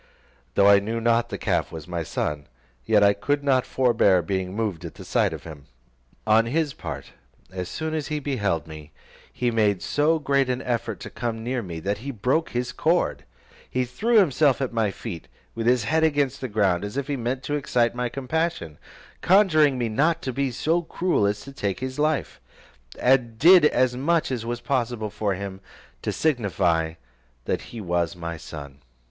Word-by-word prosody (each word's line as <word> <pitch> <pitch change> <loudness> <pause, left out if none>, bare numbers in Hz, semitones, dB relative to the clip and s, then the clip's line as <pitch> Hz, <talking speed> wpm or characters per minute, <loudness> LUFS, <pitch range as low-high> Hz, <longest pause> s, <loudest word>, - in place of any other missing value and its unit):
Though 100 - +5
I 100 0 +7
knew 110 +3 -3
not 120 0 +2
the - - -4
calf - - -1
was 80 -1 -8
my 85 -1 -3
son, 75 -2 -3 0.4
yet 105 -2 +5
I 100 0 +6
could 145 +8 -1
not 130 -3 +2
forbear 115 -8 +3
being 95 -1 -2
moved 105 -7 -2
at - - -8
the - - -11
sight - - +1
of - - -7
him. 75 -4 -11 0.6
On 110 +1 +4
his 150 +2 0
part, - - -7 0.4
as 90 -1 -5
soon 160 0 -4
as 155 -3 -2
he 150 - -2
beheld 105 - -1
me, 80 -1 -11 0.4
he 125 -1 -1
made 105 -4 +1
so 150 +9 +2
great 140 -3 +1
an 125 +1 -1
effort 115 -5 -2
to - - -8
come 115 -2 -4
near 125 +1 -1
me, 85 -6 -6
that 100 +3 -2
he 135 +5 -6
broke 130 +7 0
his 125 0 -2
cord, - - 0 0.6
threw 225 - +1
himself 150 - +4
at 130 -3 -2
my 110 -3 +1
feet, 95 -4 -7 0.3
with 115 0 -3
his 125 -1 +3
head 160 +8 +1
against 145 -4 +1
the 130 - -2
ground, 100 -5 +1
as 105 +6 -5
if 140 - -1
he 145 - -2
meant 125 +1 -3
to 145 - -3
excite 125 -5 +1
my 125 0 -2
compassion, 135 - -3 0.4
conjuring 155 -8 +4
me 120 -2 0
not 150 +10 +1
to 130 - -3
be 140 +1 0
so 160 +7 0
cruel 170 - 0
as 105 0 -2
to 140 - -10
take 100 -7 -2
his 130 +1 -5
life; 150 - 0 0.6
and 125 -3 +2
did 170 +4 +7
as 130 -3 +2
much 155 +4 +1
as 115 -3 -3
was 120 0 -3
possible 120 -5 -1
for 100 -2 -1
him, 95 0 -6 0.4
to - - -2
signify 90 - 0 0.5
that - - -1
he 115 - -8
was 85 -4 -1
my 85 -1 -5
son. 70 -4 -9
120 Hz, 190 wpm, -24 LUFS, 100-140 Hz, 0.6 s, I